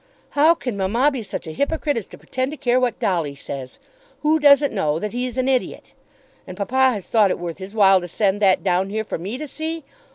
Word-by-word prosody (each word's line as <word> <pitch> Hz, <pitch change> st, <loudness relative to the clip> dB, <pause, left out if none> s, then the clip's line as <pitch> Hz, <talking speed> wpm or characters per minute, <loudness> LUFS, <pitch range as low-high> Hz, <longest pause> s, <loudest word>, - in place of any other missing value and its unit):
"How 310 Hz, +4 st, +4 dB
can 250 Hz, -9 st, -4 dB
mamma 230 Hz, +9 st, +2 dB
be 265 Hz, -4 st, -4 dB
such 210 Hz, -, -6 dB
a 160 Hz, -, -6 dB
hypocrite 290 Hz, -, -1 dB
as 225 Hz, -4 st, -4 dB
to -, -, -13 dB
pretend 260 Hz, +1 st, -3 dB
to 305 Hz, -, -7 dB
care 245 Hz, -1 st, +2 dB
what 245 Hz, -2 st, 0 dB
Dolly 165 Hz, -7 st, -1 dB
says? 135 Hz, -2 st, -8 dB, 0.5 s
Who 310 Hz, +1 st, +3 dB
doesn't 285 Hz, -2 st, +5 dB
know 155 Hz, -7 st, 0 dB
that 210 Hz, +5 st, -4 dB
he's 250 Hz, 0 st, -3 dB
an 255 Hz, 0 st, 0 dB
idiot? 260 Hz, -2 st, -1 dB, 0.5 s
And -, -, -9 dB
papa 260 Hz, +5 st, +2 dB
has 200 Hz, -4 st, -6 dB
thought 215 Hz, -3 st, +4 dB
it -, -, -1 dB
worth 175 Hz, 0 st, -6 dB
his 195 Hz, +3 st, -9 dB
while 195 Hz, -3 st, +5 dB
to 175 Hz, -, -6 dB
send 200 Hz, +3 st, 0 dB
that 190 Hz, -2 st, +3 dB
down 190 Hz, 0 st, +1 dB
here 220 Hz, +2 st, -2 dB
for 205 Hz, -, -5 dB
me 200 Hz, +8 st, -5 dB
to 305 Hz, +2 st, -6 dB
see! 320 Hz, +3 st, -5 dB
225 Hz, 230 wpm, -21 LUFS, 190-265 Hz, 0.5 s, doesn't